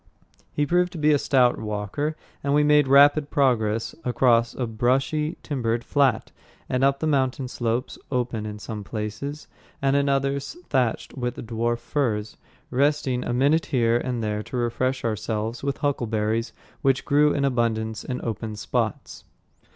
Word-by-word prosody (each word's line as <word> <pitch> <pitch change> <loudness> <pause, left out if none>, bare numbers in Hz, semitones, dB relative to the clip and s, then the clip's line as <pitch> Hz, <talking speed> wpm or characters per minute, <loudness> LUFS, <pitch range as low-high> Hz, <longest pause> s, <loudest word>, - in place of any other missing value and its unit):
He 145 - 0
proved 180 +3 +2
to - - -6
be 155 0 +3
a 145 - +3
stout 125 -4 +3
walker, 105 +8 -3 0.3
and 140 0 +1
we 150 - +4
made 150 -1 +4
rapid 145 +2 +6
progress 115 -5 +1
across 120 -2 +2
a 125 - -1
brushy 135 +8 0
timbered 120 -5 -1
flat 140 -2 +1 0.4
and 125 +1 0
up 140 0 +3
the - - 0
mountain 135 -3 +1
slopes, 120 0 -2
open 120 -4 -1
in 105 0 -6
some 105 0 -6
places, 110 +8 -5 0.3
and 135 0 +2
in 140 0 +2
others 140 - -1
thatched 125 -4 0
with 125 -2 -3
dwarf 115 +1 -1
firs, 115 -4 -2 0.4
resting 135 -1 +1
a - - -3
minute 140 +6 +2
here 120 -4 +2
and 120 -2 -3
there 105 -1 -1
to 125 - -6
refresh 130 +2 -1
ourselves 110 +1 -2
with 140 0 -2
huckleberries, 115 -5 -1 0.3
which 135 -1 +2
grew 150 0 +4
in 140 - 0
abundance 115 -4 0
in 125 - -4
open 110 -1 -4
spots. 105 - -3
125 Hz, 155 wpm, -24 LUFS, 115-140 Hz, 0.4 s, rapid